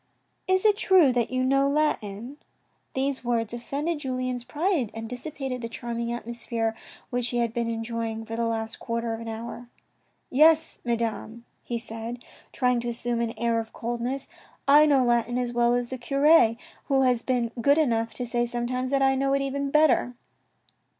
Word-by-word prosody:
" - - -46
Is 375 +2 +2
it 420 -1 +5
true 370 - +5
that 240 -2 +1
you 255 0 0
know 275 +1 +3
Latin? 265 -4 -1 0.3
" - - -45
These 265 0 -1
words 230 -2 -1
offended 285 +7 -3
Julien's 255 -3 -3
pride, 295 - 0
and 225 0 -5
dissipated 255 +1 -5
the 230 - -4
charming 235 0 -4
atmosphere 235 -1 -3 0.4
which 245 -1 0
he 245 - -2
had 235 -1 0
been 235 -1 -1
enjoying 225 -1 -3
for 225 0 -5
the 230 0 0
last 225 0 -3
quarter 230 0 -2
of 225 - -5
an 230 - -7
hour. 235 +2 -7 0.3
" - - -43 0.3
Yes, 315 +3 +4
Madame," 235 -1 -3 0.2
he 240 - -3
said, 230 +1 -6 0.3
trying 250 -2 +1
to 240 0 -3
assume 235 0 -2
an 230 0 -3
air 235 -1 +1
of 225 0 -7
coldness, 240 +3 -3 0.2
" - - -33
I 305 - +6
know 275 -4 +4
Latin 240 0 +1
as 245 -1 -2
well 240 0 +3
as 245 0 -2
the 260 - -4
cure, 275 -1 +4 0.3
who 270 -1 +2
has 250 -2 +2
been 245 -3 0
good 285 +4 +4
enough 230 -7 +1
to 250 - -3
say 240 0 0
sometimes 250 +2 -2
that 275 0 +2
I 270 0 +4
know 275 +1 +1
it 275 0 +1
even 275 +1 -2
better." 275 -4 +3
240 Hz, 190 wpm, -26 LUFS, 230-270 Hz, 0.4 s, I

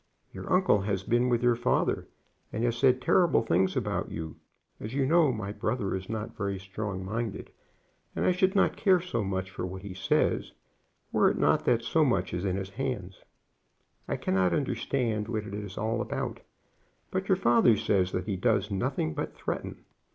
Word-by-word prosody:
"Your - - -7
uncle 185 - +4
has 100 -1 -1
been 120 +4 +2
with 120 -1 +1
your 120 0 +5
father, 120 +2 0 0.4
and 110 - -2
has 120 -1 +1
said 130 +1 +3
terrible 175 -5 +4
things 95 -2 +1
about - - -1
you. 80 -2 -6 0.4
As 110 +5 -6
you 140 -1 +2
know, 160 0 +4
my 105 -4 -4
brother 105 -1 -2
is 95 +1 -6
not 110 -1 -4
very 100 -1 -2
strong 95 0 -5
minded, 110 +1 -4 0.6
and - - 0
I - - +5
should 185 +2 +2
not 195 - +3
care 190 -4 +4
so 145 -11 -2
much 95 -1 -3
for - - -5
what 95 +1 -5
he 100 -2 -6
says 95 +1 0 0.6
were - - +4
it - - -2
not - - +2
that 115 -2 +2
so 155 +7 +2
much 95 -10 +1
is 90 +2 -2
in 95 -1 0
his 95 0 -4
hands. 100 -6 -4 0.9
I - - -1
cannot 95 -2 +1
understand 120 -6 -1
what 110 -2 -2
it 100 - -8
is 105 -2 -6
all 110 +2 -1
about, - - -3 0.7
but - - -2
your - - +5
father 115 -1 +4
says 95 -3 +1
that 90 -1 -2
he 100 - -2
does 110 +1 +1
nothing 100 - -1
but - - -4
threaten. - - -5
110 Hz, 190 wpm, -28 LUFS, 95-125 Hz, 0.9 s, your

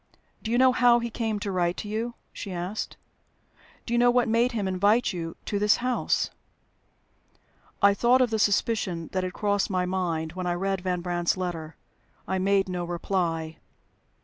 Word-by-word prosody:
"Do 220 - -5
you 235 - +2
know 260 0 +6
how 245 -1 +5
he 235 0 -3
came 220 -2 -2
to 200 - -2
write 175 -1 0
to 210 - -5
you?" 225 +3 -3 0.2
she 200 - -6
asked. 180 +4 -4 0.9
"Do 235 - -3
you 240 - +3
know 245 0 +5
what 245 0 +3
made 230 +3 +2
him 210 -4 -1
invite 205 +5 +2
you 165 -2 -5
to 205 - -1
this 210 0 +4
house?" 250 0 0 1.5
I 200 0 +7
thought 245 +5 +4
of 250 -3 +2
the 220 - 0
suspicion 200 -5 0
that 185 -1 -1
had 185 0 -3
crossed 205 -1 0
my 185 -2 0
mind 170 -3 -2
when 185 0 -4
I 175 - 0
read 195 +1 -1
Van 180 -1 -1
Brandt's 175 0 0
letter. 165 -4 -4 0.5
I 190 - -1
made 195 +1 +2
no 180 -1 -3
reply. 170 -2 -2
195 Hz, 180 wpm, -26 LUFS, 180-225 Hz, 1.5 s, I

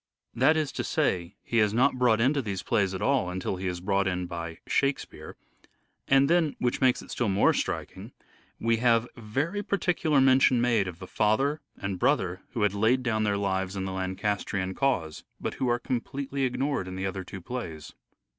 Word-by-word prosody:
That 140 +6 +4
is 150 -3 0
to - - -3
say, 85 -2 -1
he 115 - 0
is 105 0 +2
not 130 +1 +3
brought 120 -3 +4
into 140 +5 +2
these 100 -5 -4
plays 100 -5 +1
at 95 - -4
all 135 -9 +2
until 95 +1 -3
he 95 +1 -3
is 90 -1 -3
brought 95 +1 +1
in 90 -1 -1
by 85 -1 -6
" - - -52
Shakespeare 140 0 -2 0.4
"; - - -46
and 135 0 +5
then, 165 -2 +2
which 125 +2 -1
makes 130 -1 +3
it - - -12
still 120 -4 0
more 100 +2 +4
striking, - - -4 0.5
we 115 0 +2
have 115 0 +3
very 135 - -2
particular 175 -7 +1
mention 130 -1 +5
made 115 -5 +2
of 90 -2 -6
the 95 - -9
father 135 +11 +1 0.2
and 100 -2 -4
brother 90 0 +1
who 115 -4 0
had 105 -1 +2
laid 115 +5 +2
down 110 -3 0
their 100 -1 +1
lives 95 -1 -1
in 95 -1 -3
the 95 - -3
Lancastrian 95 0 -2
cause, 95 - -1 0.2
but - - -3
who 130 - +2
are 120 - +2
completely 135 +3 -3
ignored 130 -4 -1
in 95 - -6
the 95 +1 -3
other 95 0 -3
two 95 +1 -8
plays. 85 -8 -6
110 Hz, 200 wpm, -27 LUFS, 95-130 Hz, 0.5 s, and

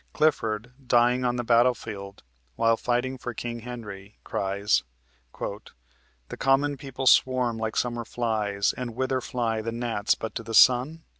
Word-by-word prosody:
Clifford, 115 -6 0
dying 120 +1 +3
on 120 0 +1
the 120 - -2
battlefield 115 -4 0 0.3
while 115 - +3
fighting 125 +3 -1
for 120 -1 -6
King 120 0 -4
Henry, 110 -4 -9
cries: 100 -5 0 0.6
"The - - -10
common 140 +2 +2
people 135 -1 -6
swarm 125 -2 +4
like 110 -1 -3
summer 120 -1 -1
flies, 110 -4 -1
And 120 -3 -6
whither 130 0 -1
fly 115 -3 -2
the 115 +1 -4
gnats 115 -3 0
but 110 - -6
to - - -4
the 115 0 -5
sun? 130 +8 +5
120 Hz, 145 wpm, -26 LUFS, 110-125 Hz, 0.6 s, sun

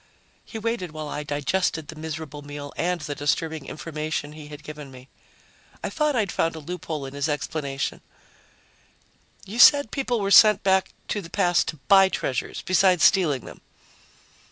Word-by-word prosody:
He 225 - -8
waited 220 -7 -3
while 155 -1 -6
I 145 - -4
digested 150 +2 -1
the 160 - -8
miserable 155 -2 -6
meal 145 0 -8
and 175 0 -1
the 150 - -4
disturbing 150 +1 -2
information 155 -2 -4
he 150 -1 -11
had 150 0 -11
given 150 -2 -9
me. 130 0 -14 0.7
I - - -3
thought 300 -2 0
I'd 215 -5 0
found 165 0 0
a - - -6
loophole 155 -2 -5
in 135 - -8
his 140 +2 -2
explanation: 140 -1 -3 1.4
"You 220 +5 -6
said 285 -3 +7
people 255 -4 -1
were 200 -1 -1
sent 210 -1 +7
back 190 -1 +2 0.2
to 205 - -1
the 165 - -11
past 175 -2 +2
to - - -3
buy 195 -1 +7
treasures, 130 -8 -3
besides 185 -2 +3
stealing 155 - +3
them." - - -12
160 Hz, 165 wpm, -24 LUFS, 145-190 Hz, 1.4 s, said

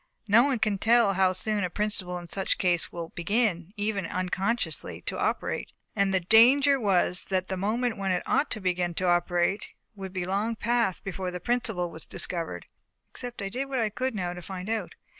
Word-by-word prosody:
Now 215 +3 +7
no 270 - +3
one 270 -3 +1
can 210 -3 0
tell 230 -2 +4
how 190 -1 +3
soon 205 +2 -1
a 180 - 0
principle 190 -2 -2
in 175 - -8
such 190 +3 -1
a - - -23
case 175 -2 +1
will 170 -1 -6
begin, 180 -1 0
even 205 -3 -1
unconsciously, 190 +6 -2
to - - -4
operate; - - -1 0.2
and 200 -2 +2
the 190 - +3
danger 260 +9 +6
was 185 -4 +2
that 185 -1 -1
the 190 - -1
moment 220 +5 -1
when 195 -1 -2
it 180 - 0
ought 295 - +1
to 220 - -3
begin 180 -2 -1
to 185 - 0
operate 175 +3 +1 0.3
would 195 -2 -7
be 185 -2 -3
long 205 +5 -1
past 230 -4 0
before 190 -1 -4
the 180 0 -5
principle 205 -5 -1
was 160 - -10
discovered, 170 -2 -3 0.5
except 245 -4 -5
I 195 - -2
did 255 +7 -3
what 270 - -2
I 225 -3 +1
could 250 +3 -2
now 180 -3 -2
to 180 - -8
find 185 +2 -6
it - - +2
out. 210 -6 -4
195 Hz, 210 wpm, -27 LUFS, 180-225 Hz, 0.5 s, Now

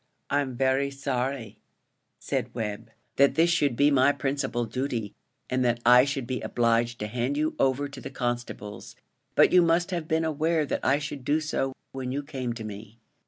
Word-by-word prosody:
"I'm 140 -3 0
very 135 +2 +2
sorry," 130 -5 -3 0.6
said - - -3
Webb, 105 -3 -4 0.3
"that 140 0 +5
this 170 +1 +4
should 145 -7 +2
be 145 +4 +4
my 135 0 +5
principal 135 -4 -2
duty, 115 -2 -3 0.3
and 130 0 0
that 120 -1 +1
I 125 +2 +8
should 135 -2 -2
be 125 +1 -3
obliged 115 0 +1
to 105 - -2
hand 125 +5 -2
you 155 +1 0
over 135 +2 +2
to 140 -1 -10
the - - -6
constables; 120 -5 -5 0.4
but - - +6
you 180 - +8
must 170 +2 +2
have 170 -3 -3
been 160 0 +1
aware 160 +1 +1
that - - -3
I 135 +2 +3
should 145 -2 -6
do 150 +4 +2
so, 145 -4 -2 0.2
when 130 -1 -4
you 140 +2 -2
came 130 -4 -4
to 115 -1 -7
me." 110 +1 -9
135 Hz, 185 wpm, -27 LUFS, 120-145 Hz, 0.6 s, I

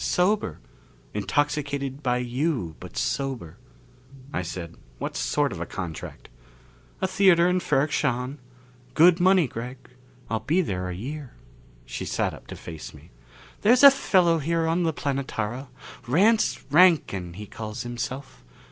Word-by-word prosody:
Sober. 180 - +1 0.6
Intoxicated 140 - -1
by 125 -3 +1
you, 125 - -2
but - - -10
sober." 125 - -2 0.8
I - - 0
said, 85 -1 -6 0.2
"What - - -4
sort 145 -3 0
of 90 -4 -6
a 85 - -4
contract?" 85 -5 -7 0.7
"A 190 - +2
theater 185 -2 +5
in 180 0 +2
Ferrok 150 -3 +1
Shahn. 125 +3 -1 0.6
Good 170 +2 +6
money, 185 -1 +5
Gregg. 125 +3 -6 0.5
I'll 110 - -1
be 170 +10 +1
there 90 - -3
a 90 - -4
year." 135 +6 -7 0.5
She - - -5
sat - - -1
up - - -13
to - - -7
face 80 -2 -9
me. - - -16 0.5
"There's 245 +6 +5
a 280 - +12
fellow 180 -10 +3
here 165 +2 0
on 165 +2 +1
the 165 -2 +2
Planetara, 135 -4 -3 0.4
Rance 205 - +3
Rankin, 145 - +4
he 105 +4 -8
calls 110 +1 -6
himself. 130 +3 -6
140 Hz, 140 wpm, -25 LUFS, 110-170 Hz, 0.8 s, a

